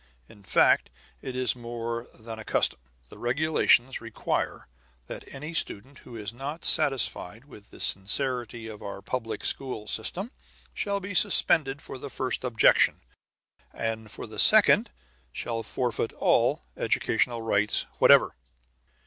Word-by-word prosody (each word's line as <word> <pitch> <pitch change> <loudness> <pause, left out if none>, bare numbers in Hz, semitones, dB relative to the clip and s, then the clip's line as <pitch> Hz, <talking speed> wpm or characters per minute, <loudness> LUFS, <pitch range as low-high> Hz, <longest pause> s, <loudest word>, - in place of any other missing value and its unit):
In 105 - -18
fact, 95 - +2 0.3
it 130 -2 -7
is 125 -3 0
more 115 0 -6
than 115 0 -10
a - - -8
custom; - - 0 0.3
the - - -14
regulations 130 -1 +1
require 115 -1 -4 0.4
that - - -9
any 150 +4 -8
student 135 -3 -3
who 120 - -13
is 105 -1 -7
not 140 +6 -7
satisfied 135 - +3
with 105 -8 -16
the - - -15
sincerity 120 +3 -1
of 110 -2 -10
our 100 -1 -8
public 115 0 -5
school 125 -6 -1
system 180 - -2 0.4
shall 200 -1 -3
be 200 +1 -7
suspended 145 -5 +4
for 130 - -10
the 140 - -8
first 130 -1 -4
objection, 120 -3 +2 0.7
and 110 -1 -5
for - - -9
the - - -9
second - - +7 0.4
shall 115 - -5
forfeit 115 -1 -3
all - - +1
educational 120 -2 -1
rights 105 -1 +1
whatever. - - +5
120 Hz, 135 wpm, -26 LUFS, 110-135 Hz, 0.7 s, second